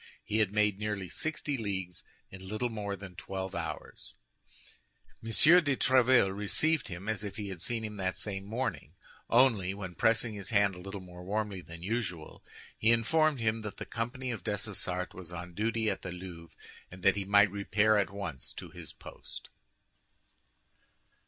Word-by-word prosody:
He 110 - 0
had 105 -3 +3
made 105 -1 +2
nearly 105 -3 -2
sixty 150 - -2
leagues 95 -5 -3 0.3
in 95 0 -9
little 110 +5 -1
more 100 -2 -3
than 95 -2 -10
twelve 95 +1 -5
hours. - - -6 1.1
M. 115 - -5
de 155 +4 +6
Tréville 125 -6 +5
received 155 +10 +2
him 90 +2 -6
as 110 -1 0
if 100 -1 -5
he 105 -1 -4
had 90 -3 -7
seen 115 +2 -1
him 105 -1 -6
that 95 -1 -1
same 95 -2 -2
morning; 105 - -3 0.3
only, 115 -7 +4
when 95 -3 -6
pressing 115 +4 +2
his 100 -2 -5
hand 100 -3 +4
a 90 - -9
little 95 +1 -6
more 90 -1 -11
warmly 100 0 -2
than 85 +1 -10
usual, 95 -6 -3 0.3
he 110 - +2
informed 150 +5 +3
him 110 0 +1
that 105 -1 -6
the - - -5
company 125 +3 -3
of 110 -7 -5
Dessessart 95 -3 -2
was 90 -1 -8
on 90 0 -7
duty 110 +3 0
at - - 0
the 95 - -5
Louvre, 90 -2 -9 0.3
and 90 +1 -12
that 95 - +5
he 100 - -1
might 100 0 +5
repair 105 +1 +3
at 100 - +1
once 95 -11 -5
to - - -8
his - - -7
post. - - -10
100 Hz, 170 wpm, -31 LUFS, 95-115 Hz, 1.1 s, de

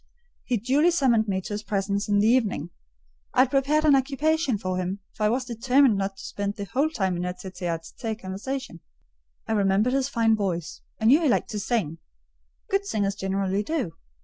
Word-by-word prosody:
He 245 - +1
duly 270 - +3
summoned 255 -10 +2
me 190 -1 -1
to 205 - -6
his 205 - -3
presence 200 -1 -2
in 205 - +3
the 205 +2 +4
evening. 230 -4 +1 0.6
I - - +6
had 260 0 +2
prepared 290 +3 +2
an 290 -2 +6
occupation 280 0 +1
for 185 -2 -3
him; 185 +1 -2 0.2
for 215 - 0
I - - +2
was 255 +3 0
determined 250 +1 +3
not 195 0 -2
to - - -10
spend 200 0 -3
the 200 - -5
whole 270 +10 0
time 190 - -1
in 175 - -3
a 180 0 -3
tête 185 0 -10
à 170 -2 -1 0.2
tête 225 -2 -3
conversation. 200 +2 -5 0.7
I - - -3
remembered 205 +3 +2
his 270 0 +1
fine 225 -3 +3
voice; 175 -6 -3 0.2
I 220 - -2
knew 275 +8 +6
he 310 - +2
liked - - +1
to 210 - -3
sing—good 150 - -4
singers 200 - 0
generally 195 0 -1
do. 235 - -2
215 Hz, 200 wpm, -25 LUFS, 195-265 Hz, 0.7 s, I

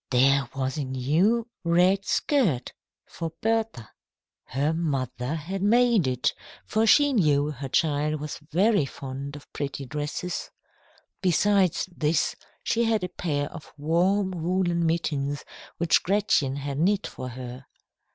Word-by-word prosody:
There 135 0 +3
was 135 +2 -2
a - - 0
new 155 - +1 0.2
red 180 +3 +3
skirt 215 - +1 0.3
for 165 -1 -6
Bertha. 225 - -1 0.5
Her 145 +4 0
mother 140 -4 -2
had 180 +5 -4
made 230 - +4
it, 125 -1 0 0.3
for 220 +1 +1
she 290 +4 +5
knew 150 - +2
the 135 - -4
child 150 +1 +1
was 150 0 -6 0.5
fond 140 +1 -7
of 145 - -13
pretty 140 -1 -4
dresses. 150 +6 -4 0.7
Besides 190 0 +2
this, 155 0 +1 0.3
she 235 +1 +1
had 220 -4 +1
a 180 - -2
pair 145 -5 -2
of 165 - -11
warm 180 +6 +2
woollen 175 -1 0
mittens 145 -4 -1 0.3
which 170 -1 +3
Gretchen 185 -9 +1
had 140 0 -4
knit 200 +5 +2
for 130 - -6
her. 125 +1 -8
160 Hz, 130 wpm, -26 LUFS, 140-190 Hz, 0.7 s, she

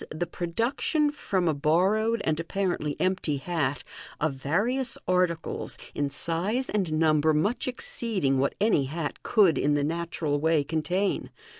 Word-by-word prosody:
the 155 +3 -3
production 230 - 0
from 190 - -1
a 160 - +3
borrowed 195 +10 +2
and 155 0 0
apparently 170 -4 -2
empty 185 -5 0
hat 145 -3 -2 0.4
of 155 -2 0
various 225 - 0
articles, 180 -3 0 0.2
in 145 -1 -1
size 175 - -1
and 190 -6 0
number 155 -1 +3
much 205 +14 0
exceeding 205 - -1
what 140 - +1
any 205 -9 +3
hat 150 +2 -4
could 190 - +4
in 145 0 +2
the 145 - +1
natural 160 -2 -1
way 160 -1 +2
contain. 165 +6 -1
165 Hz, 140 wpm, -27 LUFS, 150-200 Hz, 0.4 s, could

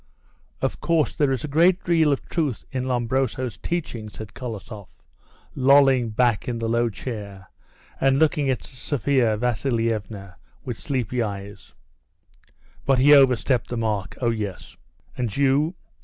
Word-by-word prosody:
"Of - - -1
course, 165 -3 +1
there 145 -3 +2
is 130 - -2
a - - -3
good 170 +5 +3
deal 160 -4 +3
of 140 - -2
truth 150 -10 -2
in 130 -1 -2
Lombroso's 125 -1 -1
teaching," 135 -11 -4
said 105 -1 -10
Kolosoff, 110 -4 -9 0.5
lolling 135 -2 +4
back 115 -1 +1
in 120 -2 -2
the 115 0 -2
low 115 +1 +1
chair 100 - -8 0.5
and 135 0 +3
looking 150 -2 +2
at 130 - -1
Sophia 130 -4 0
Vasilievna 110 -5 -2 0.3
with 120 -4 -5
sleepy 125 -3 -2
eyes; 100 - -6 1.1
"but 135 -1 +2
he 140 +3 +6
over 135 -3 +7
stepped 125 +1 -1
the 120 - -3
mark. 105 -4 -2
Oh, 120 -2 +2
yes." 105 -4 -5 0.4
"And 120 -3 -3
you? 140 +5 +2
125 Hz, 140 wpm, -23 LUFS, 110-140 Hz, 1.1 s, over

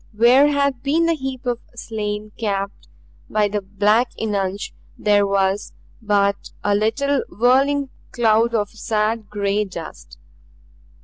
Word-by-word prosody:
Where 250 +5 +6
had 280 -3 +1
been 310 +5 +2
the 335 - +3
heap 265 -3 -5
of 240 -1 -1 0.2
slain 215 -2 -4
capped 200 -3 -3 0.4
by 210 -1 +2
the 205 0 -2
black 210 +5 +2
eunuch 200 -3 -1 0.4
there 205 -1 +3
was 195 0 0 0.3
but 200 -2 +1
a 205 - +2
little 255 +7 +1
whirling 270 +4 +2 0.2
cloud 230 0 +2
of 205 -2 0
sad 220 -1 -1
gray 205 0 0
dust. 160 - -9
215 Hz, 125 wpm, -21 LUFS, 205-245 Hz, 0.4 s, Where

